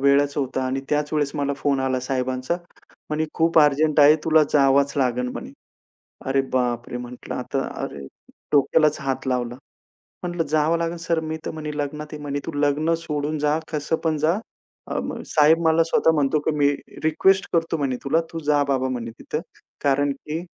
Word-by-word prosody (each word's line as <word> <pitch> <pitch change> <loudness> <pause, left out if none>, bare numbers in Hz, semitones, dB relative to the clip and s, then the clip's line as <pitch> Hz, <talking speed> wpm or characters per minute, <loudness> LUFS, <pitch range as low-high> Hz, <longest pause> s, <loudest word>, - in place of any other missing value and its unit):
वेळच 140 +1 +3
होता 130 -2 -1
आणि 135 +1 -1
त्याच 150 0 0
वेळेस 145 -2 0
मला 140 0 0
फोन 140 -1 0
आला 130 -1 0
साहेबांचा. 130 +4 -1 0.5
म्हणे 155 +1 0
"खूप 165 0 +3
अर्जंट 150 +1 +4
आहे 150 +2 +8
तुला 160 -1 +5
जावच 140 0 +4
लागेल 125 -1 +1
म्हणे." - - -7 0.7
अरे 135 0 +2
बापरे! 120 -1 -1
म्हटलं 125 0 -7
आता - - -2 0.2
अरे 70 -1 -6 0.5
डोक्यालाच 150 +2 +3
हात 135 -1 -3
लावला. 125 -1 -1 0.7
म्हटलं 175 -2 -1
"जावं 155 +2 +2
लागेल 170 +1 -2
सर 165 0 0
मी 160 0 -4
तर - - -2
म्हणे 155 -1 -5
लग्नात" 150 +1 -4
म्हणे 145 -1 -3
"तू - - -2
लग्न 150 +3 +2
सोडून 150 -1 -3
जा 150 +1 +2
कसं 150 +1 0
पण 155 -1 +2
जा" 155 +3 +2 0.6
अ, - - 0 0.3
साहेब 155 +2 +5
मला 160 +1 +4
स्वतः 160 0 +3
म्हणतो, 145 +1 +2
की 155 - -1
मी 145 -1 +4 0.4
रिक्वेस्ट 190 +5 +3
करतो 165 -1 +1
म्हणे 135 -3 -1
तुला, 160 +4 +2
तू 165 - -3
जा 145 -1 +4
बाबा 130 -1 +1
म्हणे 115 -2 -4
तिथं. 150 - -4 0.4
कारण 140 0 +2
की 150 +4 -5
145 Hz, 170 wpm, -23 LUFS, 135-155 Hz, 0.7 s, आहे